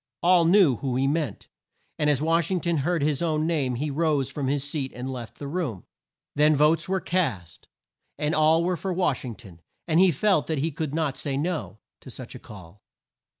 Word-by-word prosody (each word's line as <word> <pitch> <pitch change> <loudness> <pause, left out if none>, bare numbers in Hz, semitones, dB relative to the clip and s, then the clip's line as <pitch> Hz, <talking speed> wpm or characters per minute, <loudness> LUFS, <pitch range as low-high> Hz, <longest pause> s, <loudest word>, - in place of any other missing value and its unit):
All 175 -1 +5
knew 170 - +5
whom 130 -3 -2
he 135 - +1
meant, 145 -6 -2 0.5
and 150 -1 +2
as 145 0 +1
Wash 165 0 +2
ing 185 -2 0
ton 170 -1 0
heard 160 +2 0
his 150 -1 0
own 155 -2 0
name 145 -7 0
he 145 +4 -2
rose 145 -3 0
from 140 -1 -3
his 140 0 0
seat 145 -3 -3
and 130 +2 -5
left 120 -3 -8
the 145 - -6
room. 140 - -3 0.5
Then 150 +1 +4
votes 150 +5 +2
were 190 0 +1
cast, 130 - -2 0.5
and 150 +1 -1
all 160 +2 +4
were 180 0 0
for 190 +3 -3
Wash 175 -7 0
ing 120 -4 -6
ton, 95 -8 -15 0.3
and 165 0 +3
he 190 0 +6
felt 175 +1 +1
that 160 - -1
he 155 +4 -1
could 155 0 -4
not 155 -4 -1
say 140 -2 -2
No 160 -6 -3 0.2
to - - -13
such - - -8
a - - -9
call. 95 -1 -13
150 Hz, 210 wpm, -25 LUFS, 135-165 Hz, 0.5 s, he